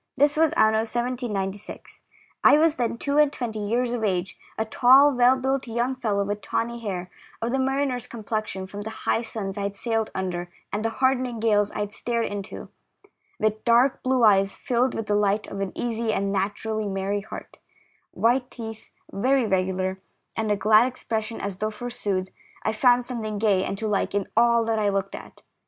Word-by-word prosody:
This 290 +2 +4
was 320 +1 +4
amio 220 0 +4
1796. 220 -5 -4 0.4
I 290 - +7
was 320 0 +3
then 235 -2 0
two 285 +4 0
and 300 -2 +5
twenty 230 -6 -4
years 235 +4 0
of 235 -2 -2
age, 185 -3 -1 0.2
a 220 - 0
tall, 265 +5 +6
well 250 +1 +5
built 265 0 -1
young 240 +3 0
fellow, 215 -6 -1
with 205 +1 -3
tawny 235 +1 -2
hair, 185 -5 -5 0.3
of 230 +1 -2
the 265 - 0
mariner's 265 -2 0
complexion, 215 -3 -4
from 200 +2 -7
the 215 - -5 0.2
high 225 - +2
suns 205 -4 -4
I - - -2
had 200 0 -3
sailed 225 +1 -1
under 175 -2 -3 0.2
and 210 +1 -1
the 225 - +1
hardening 255 -1 0
gales 210 -2 +2
I - - -4
had 205 0 -4
stared 235 +2 -1
into, 200 -1 -6 0.7
with 215 0 0
dark 240 +3 +4
blue 255 -1 +1
eyes 195 -2 +4
filled 250 -1 0
with 225 - -3
the 210 - 0
light 205 0 +2
of 200 - -7
an 195 -1 -2
easy 230 -1 -1
and 200 -2 -1
naturally 205 +2 -2
merry 195 +1 -2
heart, 215 - -10 0.5
white 245 +2 +1
teeth, 225 -2 -8 0.2
very 255 +5 +2
regular, 190 -1 0 0.4
and 220 -2 -1
a - - +3
glad 215 +4 +5
expression 225 -3 -4
as 200 -2 -4
though, 215 - 0
forsooth, 210 -4 -3 0.3
I 220 - 0
found 245 +2 +4
something 220 -4 -4
gay 200 -3 +2
and 195 - -3
to 220 - -3
like 200 -1 0
in 200 -2 +1
all 235 0 +4
that 225 -1 0
I 205 -1 +2
looked 195 -1 -2
at. - - -10
220 Hz, 190 wpm, -25 LUFS, 200-245 Hz, 0.7 s, I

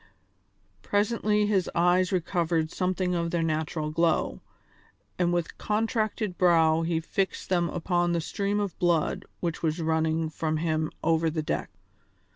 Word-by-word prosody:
Presently 210 - +1
his 200 -4 +1
eyes 180 +2 +3
recovered 170 -3 0
something 185 -1 -1
of 170 -1 0
their 170 -1 0
natural 155 -1 -2
glow, 165 +1 +1 0.8
and 175 -1 +2
with 175 -1 -2
contracted 215 -2 -1
brow 165 -3 +4
he 165 0 0
fixed 190 +3 -2
them 175 -2 +2
upon 175 0 0
the 170 - +1
stream 200 +5 -1
of 200 -4 -2
blood 175 -3 +1 0.2
which 170 -2 -2
was 160 0 0
running 160 0 0
from 155 0 -1
him 155 -1 0
over 165 0 +2
the 155 0 -2
deck. - - -2
170 Hz, 140 wpm, -27 LUFS, 160-185 Hz, 0.8 s, brow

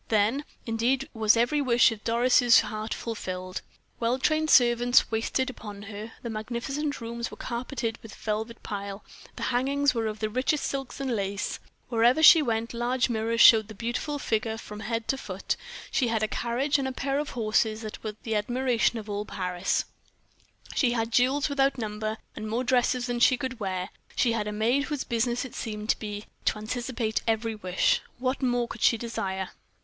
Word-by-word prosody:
Then, 225 +7 +2 0.2
indeed, 245 +4 0
was 220 -1 +4
every 240 +6 +2
wish 245 -3 +5
of 215 -2 -7
Doris' 240 0 +5
heart 215 0 -5
fulfilled. 185 -5 -4 0.4
Well 235 +2 +1
trained 310 +3 +1
servants 245 -1 +5
waited 225 +4 0
upon 205 -4 -9
her; 210 +2 -8
the 235 - -4
magnificent 245 +7 -3
rooms 235 0 -4
were - - -11
carpeted 235 -1 -3
with 225 - -11
velvet 220 +2 -4
pile, 200 0 -5 0.3
the - - -6
hangings 280 +2 +2
were 230 -2 -1
of 215 0 -4
the 215 - -1
richest 255 +6 0
silks 270 -1 -4
and 265 -3 -1
lace; 200 0 -2 0.3
wherever 240 +6 +3
she 325 +1 +10
went 230 -3 -1
large 245 +2 0
mirrors 230 +1 0
showed 220 -2 +8
the 220 - -10
beautiful 240 +7 -2
figure 220 -4 -1
from 210 -1 -9
head 225 0 -3
to 270 - +1
foot; - - -3 0.4
she 255 - +2
had 225 -2 0
a - - +2
carriage 260 +7 0
and 265 - -1
a - - -2
pair 275 +2 -1
of 300 - -3
horses 220 0 +1
that 215 - -7
were 215 -1 -4
the 225 - -2
admiration 240 0 +1
of 220 -1 -7
all 205 0 -2
Paris; 180 -2 -1 0.9
she 245 -4 +2
had 225 -1 -1
jewels 260 +5 +3
without 275 -1 +1
number, 215 -1 -3 0.2
and 215 -1 -5
more 235 +3 0
dresses 250 0 +2
than 245 -1 -2
she 250 +1 +5
could 255 -1 -4
wear; 185 -3 -2 0.3
she 235 - +3
had 215 -2 -1
a - - -2
maid 235 +7 +1
whose 295 -4 -3
business 240 +2 0
it 255 - -9
seemed 215 -1 -5
to - - -2
be 210 -1 -5 0.2
to - - +1
anticipate 230 +1 -2
every 225 0 +1
wish. 185 -4 +1 0.2
What 255 +2 -1
more 245 -2 +1
could 235 - -9
she 230 - +5
desire? 190 -5 -3
230 Hz, 185 wpm, -27 LUFS, 215-255 Hz, 0.9 s, she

